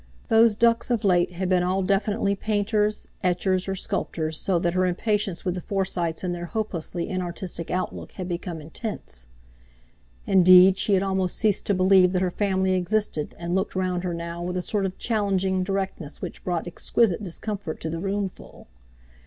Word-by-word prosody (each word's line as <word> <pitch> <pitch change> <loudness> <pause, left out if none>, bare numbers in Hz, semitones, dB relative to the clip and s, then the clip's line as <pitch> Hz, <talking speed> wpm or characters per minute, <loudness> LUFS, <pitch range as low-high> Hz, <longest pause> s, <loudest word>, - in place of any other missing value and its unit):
Those 225 -1 +5
ducks 230 +2 +2
of 235 -3 0
late 180 -2 +3
had 185 +2 -2
been 180 -1 +3
all 185 +2 0
definitely 200 +1 +1
painters, 210 +1 0 0.2
etchers, 185 +1 +1
or 195 - -1
sculptors, 160 -3 -2
so 190 -3 +1
that 170 0 0
her 185 0 +2
impatience 200 0 -1
with 180 - 0
the 180 - -5
Forsytes 175 -4 -2
and 180 -1 -1
their 175 0 -5
hopelessly 175 -5 -3
inartistic 180 -2 -4
outlook 185 +1 -3
had 185 -2 -5
become 175 -1 -4
intense. 155 - -6 1.0
Indeed, 185 0 +7
she 200 - +3
had 190 - +2
almost 190 -2 -1
ceased 210 -3 +1
to 200 - +3
believe 185 0 +5
that 180 - +1
her 180 - 0
family 190 -1 +1
existed, 185 -4 -1
and 170 0 -4
looked 190 +1 -1
round 185 -1 -1
her 175 -2 -2
now 170 0 -5
with 180 +1 -3
a 180 - -2
sort 200 -1 0
of 185 - -8
challenging 195 -4 0
directness 190 -5 -3
which - - -7
brought 175 -2 -2
exquisite 185 +3 +1
discomfort 195 -2 -5
to 160 - -3
the 165 - -3
roomful. 195 - -5
185 Hz, 175 wpm, -25 LUFS, 175-200 Hz, 1.0 s, Indeed